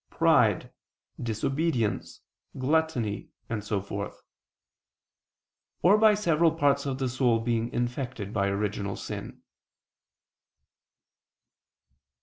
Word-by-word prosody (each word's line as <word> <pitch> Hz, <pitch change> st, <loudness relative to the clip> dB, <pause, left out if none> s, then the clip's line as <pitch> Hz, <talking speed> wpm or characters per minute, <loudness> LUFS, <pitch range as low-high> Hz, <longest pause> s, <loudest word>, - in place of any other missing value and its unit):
pride, -, -, +3 dB, 0.5 s
disobedience, 125 Hz, +1 st, -1 dB, 0.4 s
gluttony, 130 Hz, -6 st, 0 dB, 0.2 s
and 110 Hz, -3 st, -3 dB
so 105 Hz, -1 st, -1 dB
forth; 100 Hz, +1 st, -6 dB, 1.6 s
or 190 Hz, +4 st, +7 dB
by 215 Hz, 0 st, +6 dB
several 170 Hz, -5 st, +3 dB
parts 140 Hz, -3 st, +1 dB
of 135 Hz, -1 st, -2 dB
the 135 Hz, -1 st, -1 dB
soul 125 Hz, -2 st, +2 dB
being 115 Hz, 0 st, -1 dB
infected 120 Hz, -3 st, -3 dB
by 100 Hz, -2 st, +1 dB
original 100 Hz, 0 st, -2 dB
sin. -, -, -7 dB
120 Hz, 90 wpm, -28 LUFS, 105-150 Hz, 1.6 s, or